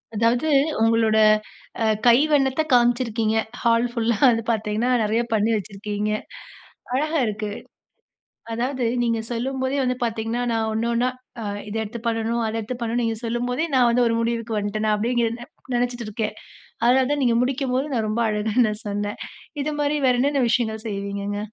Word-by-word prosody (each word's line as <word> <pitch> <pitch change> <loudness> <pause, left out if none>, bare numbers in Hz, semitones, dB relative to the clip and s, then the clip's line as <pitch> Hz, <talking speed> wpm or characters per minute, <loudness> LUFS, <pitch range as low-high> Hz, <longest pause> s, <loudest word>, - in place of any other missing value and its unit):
அதாவது, 235 +7 +2 0.3
உங்களோட 225 -1 +3 0.6
அ - - +2 0.2
கைவண்ணத்த 270 +3 +4
காமிச்சிருக்கீங்க. 235 -2 +2 0.3
ஹால் 235 0 +3
ஃபுல்லா 230 -2 0
வந்து 230 -1 +1
பார்த்தீங்கன்னா, 220 +2 -1
நெறைய 220 +3 +1
பண்ணி 215 +1 +2
வச்சிருக்கீங்க. 205 +1 -3 0.8
அழகா 305 +4 0
இருக்கு. 210 0 -3 1.0
அதாவது, 250 +2 -1 0.2
நீங்க 230 -1 +1
சொல்லும் 260 +3 -2
போதே 265 +2 0
வந்து 250 0 0
பார்த்தீங்கன்னா, 225 +1 -2
நான் 220 -1 0
ஒன்னு, 230 +2 0
ஒன்னா 245 +2 +2 0.3
ஆ - - -5 0.3
இத 205 - -6
எடுத்து 220 +2 -6
பண்ணனும், 230 +1 0
அத 220 - -3
எடுத்து 235 +3 -5
பண்ணனும் 235 +1 -1
நீங்க 225 -1 -1
சொல்லும்போதே, 245 +5 -1
நான் 245 -2 +5
வந்து 245 +1 +3
ஒரு 230 - +2
முடிவிற்கு 230 -1 -1
வந்துட்டேன் 205 +1 -2
நான் 215 - +3
அப்பிடியே 230 +4 -1
இங்கேருந்தே 235 +1 0 0.3
நெனச்சுட்டு 240 -1 -1
இருக்கேன். 215 +1 -3 0.5
அதனால 255 +2 +4
தான் 290 -1 0
நீங்க 235 -2 +3
முடிக்கும்போது 265 +1 -1
நான் 225 -3 0
ரொம்ப 230 +2 0
அழகுன்னு 215 +2 +1
நான் 210 0 -6
சொன்னேன். 205 0 -3 0.5
இதுமாரி 295 0 0
வேற 250 - +4
என்னென்ன 280 -1 +2
விஷயங்கள் 220 -2 0
செய்வீங்கங்க? 200 0 -3
230 Hz, 155 wpm, -23 LUFS, 220-250 Hz, 1.0 s, நான்